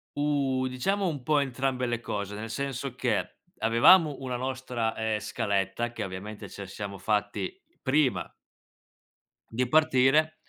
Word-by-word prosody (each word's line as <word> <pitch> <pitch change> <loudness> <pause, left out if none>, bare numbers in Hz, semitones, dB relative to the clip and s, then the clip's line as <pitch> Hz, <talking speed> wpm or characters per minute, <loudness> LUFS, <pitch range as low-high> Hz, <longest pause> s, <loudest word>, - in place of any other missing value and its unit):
Uh, 140 -3 +1
diciamo 190 +11 0
un 145 -6 -3
po' 150 0 +3
entrambe 130 -1 -1
le 120 -1 -1
cose, 105 -2 -4
nel 110 +2 -6
senso 135 0 -3
che - - -1 0.2
avevamo 145 +7 +6
una 125 -2 -3
nostra, 125 -3 -2
ehm, 110 -1 -1
scaletta 105 +1 -1
che 115 -3 -4
ovviamente 100 +3 -7
ce 100 - -7
siamo 100 +1 -6
fatti 105 - -1 0.3
prima 135 -1 +2 1.2
di 125 +2 0
partire 155 +1 +4
125 Hz, 130 wpm, -28 LUFS, 110-140 Hz, 1.2 s, avevamo